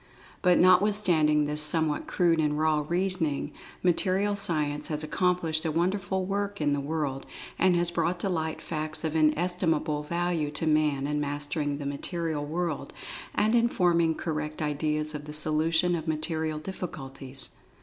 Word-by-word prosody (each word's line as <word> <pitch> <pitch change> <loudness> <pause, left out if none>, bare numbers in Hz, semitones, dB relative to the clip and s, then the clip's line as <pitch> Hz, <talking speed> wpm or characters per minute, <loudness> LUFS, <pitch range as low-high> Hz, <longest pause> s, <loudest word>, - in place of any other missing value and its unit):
But 180 -2 +4
notwithstanding 180 -5 +4
this 150 +1 0
somewhat 155 0 +2
crude 170 -2 +2
and 150 -1 +1
"raw" 155 -1 +2
reasoning, 175 -5 0 0.3
Material 190 +3 +2
Science 150 -6 0
has 155 -1 -1
ac[Pg 180 +3 +1
23]complished 160 -1 -1
a 165 - 0
wonderful 190 +3 -1
work 200 +1 -2
in 145 -2 +1
the 145 - 0
world, 140 -2 -3 0.3
and 185 -1 +4
has 175 0 +3
brought 175 +1 -1
to - - -1
light 160 -4 -2
facts 155 -1 -3
of 160 -1 -2
inestimable 160 -1 +1
value 170 0 -1
to 155 - -3
Man 150 -3 +2
in 150 +1 -1
mastering 145 0 -2
the 145 - -6
material 155 +2 -2
world, 160 0 -3 0.4
and 215 +2 +2
in 235 0 +4
forming 170 -5 +2
correct 155 -2 -4
ideas 150 0 -1
of 150 -1 -6
the 150 - -8
solution 160 +3 +2
of 165 -1 -3
material 155 0 -1
difficulties. 135 -6 -5
160 Hz, 155 wpm, -27 LUFS, 150-175 Hz, 0.4 s, But